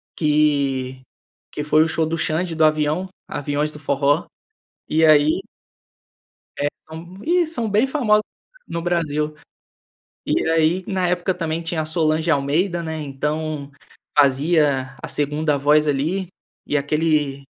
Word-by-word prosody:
que, 140 Hz, -4 st, +1 dB, 0.5 s
que 150 Hz, -, -4 dB
foi 155 Hz, +1 st, +4 dB
o 160 Hz, -, 0 dB
show 160 Hz, 0 st, 0 dB
do 165 Hz, +1 st, -2 dB
Xand 165 Hz, +2 st, -1 dB
do 160 Hz, 0 st, +4 dB
Avião, 155 Hz, +4 st, +1 dB, 0.2 s
Aviões 145 Hz, +1 st, -2 dB
do 150 Hz, -, -10 dB
forró. 145 Hz, +1 st, +1 dB, 0.6 s
E 160 Hz, +1 st, +3 dB
aí 155 Hz, 0 st, +5 dB, 1.2 s
é, 145 Hz, -, -1 dB, 0.2 s
são, 165 Hz, +3 st, -10 dB
ih, 345 Hz, +1 st, +2 dB
são 240 Hz, -8 st, -3 dB
bem 215 Hz, +6 st, +3 dB
famosos 230 Hz, -7 st, +2 dB, 0.4 s
no 170 Hz, -, -4 dB
Brasil. 155 Hz, -3 st, -1 dB, 0.9 s
E -, -, +1 dB
aí 165 Hz, +3 st, +2 dB
na 185 Hz, -3 st, 0 dB
época 180 Hz, +1 st, 0 dB
também 165 Hz, -1 st, -3 dB
tinha 165 Hz, -1 st, -2 dB
a -, -, -4 dB
Solange 160 Hz, +1 st, 0 dB
Almeida, 160 Hz, +5 st, +1 dB
né. 160 Hz, -1 st, -4 dB
Então 150 Hz, +1 st, -3 dB, 0.5 s
fazia 140 Hz, -2 st, +3 dB
a -, -, -5 dB
segunda 150 Hz, +1 st, 0 dB
voz 150 Hz, +2 st, +3 dB
ali 160 Hz, +7 st, -1 dB, 0.4 s
e 150 Hz, -, 0 dB
aquele 145 Hz, -1 st, 0 dB
155 Hz, 135 wpm, -21 LUFS, 145-170 Hz, 1.2 s, aí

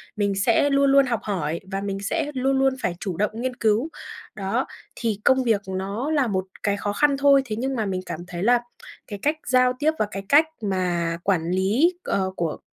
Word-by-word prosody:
mình 200 Hz, -2 st, 0 dB
sẽ 230 Hz, +8 st, +3 dB
luôn 275 Hz, 0 st, +3 dB
luôn 275 Hz, 0 st, +6 dB
học 235 Hz, -4 st, -1 dB
hỏi 170 Hz, -5 st, -2 dB
và 195 Hz, 0 st, -2 dB
mình 195 Hz, -1 st, -3 dB
sẽ 295 Hz, +9 st, -1 dB
luôn 265 Hz, +1 st, +1 dB
luôn 270 Hz, 0 st, +3 dB
phải 175 Hz, -1 st, -1 dB
chủ 185 Hz, -5 st, -4 dB
động 210 Hz, +1 st, +1 dB
nghiên 250 Hz, +2 st, -3 dB
cứu. 225 Hz, +6 st, +1 dB, 0.5 s
Đó, 215 Hz, +6 st, -1 dB, 0.3 s
thì 220 Hz, -4 st, -2 dB
công 260 Hz, 0 st, +4 dB
việc 225 Hz, -5 st, +2 dB
nó 200 Hz, +9 st, -3 dB
là 285 Hz, -5 st, +2 dB
một 190 Hz, -2 st, -1 dB, 0.2 s
cái 205 Hz, -1 st, +1 dB
khó 205 Hz, 0 st, -2 dB
khăn 285 Hz, +4 st, +2 dB
thôi, 280 Hz, 0 st, +5 dB
thế 215 Hz, -, -4 dB
nhưng 265 Hz, +2 st, -1 dB
mà 220 Hz, -3 st, -1 dB
mình 185 Hz, -1 st, -2 dB
cảm 160 Hz, -, -5 dB
thấy 175 Hz, 0 st, -5 dB
là 240 Hz, +2 st, +4 dB, 0.5 s
cái 205 Hz, -2 st, -7 dB
cách 300 Hz, +2 st, +2 dB
giao 255 Hz, 0 st, +4 dB
tiếp 305 Hz, +1 st, +3 dB
và 215 Hz, -, +3 dB
cái 195 Hz, -, -5 dB
cách 300 Hz, +3 st, +6 dB, 0.2 s
mà 175 Hz, -4 st, -1 dB
quản 175 Hz, -4 st, 0 dB
lý, 210 Hz, -, +2 dB
ờ, 190 Hz, -1 st, -1 dB
của 165 Hz, -3 st, -2 dB
215 Hz, 215 wpm, -24 LUFS, 190-265 Hz, 0.5 s, luôn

